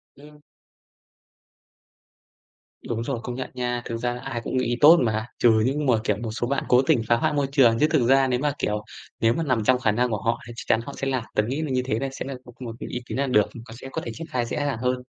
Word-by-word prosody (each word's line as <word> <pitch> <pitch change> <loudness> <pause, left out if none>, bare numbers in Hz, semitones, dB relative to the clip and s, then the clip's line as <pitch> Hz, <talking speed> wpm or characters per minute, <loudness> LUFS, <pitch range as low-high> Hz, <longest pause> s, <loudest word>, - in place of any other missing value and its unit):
Ừm. 150 +1 -16 2.5
Đúng 115 0 -2
rồi, 125 -1 -3
công 120 - -5
nhận 130 - -5
nha. 125 -1 -2
Thực 115 - -3
ra 120 +1 -2
ai 120 -3 -4
cũng 130 - -2
nghĩ 120 -1 0
tốt 165 +4 +9
mà, 110 -1 0
trừ 120 - +5 0.2
những 145 +3 0
mà, 125 - +4
kiểu, 105 -4 0
một 110 - -3
số 120 +2 -2
bạn 140 +2 -1
cố 125 +1 +5
tình 125 - +2
phá 120 - +4
hoại 150 +6 0
môi 145 -2 +1
trường, 120 -5 +4
chứ 150 - +4
thực 135 -8 +3
ra 135 0 +5
nếu 125 -1 0
mà, 145 +1 +1
kiểu, 105 0 -1 0.4
nếu 115 0 +3
mà 165 - -1
nằm 130 -6 0
trong 125 +3 +3
khả 115 - +2
năng 125 +3 +1
của 105 -3 -2
họ 115 +1 0
thì 120 - -8
chắc - - -7
chắn 115 - +3
họ 140 - -7
sẽ 135 - -2
làm. 130 -3 -1
Tớ 105 - +3
nghĩ 135 +5 -2
là 155 - -3
như 130 0 +1
thế 115 -4 -1
này 135 0 -2
sẽ 135 - -6
là 135 0 -5 0.2
một 120 -3 -6
cái - - -6
ý 125 - -3
kiến - - -5
là 140 - 0
được, 105 -5 +3 0.2
có 115 - -11
sẽ 135 - -8
có 160 - -3
thể - - -4
triển 165 - -8
khai 125 -5 -1
dễ - - -4
dàng 145 -4 -1
hơn. 125 +1 -1
125 Hz, 275 wpm, -24 LUFS, 115-135 Hz, 2.5 s, tốt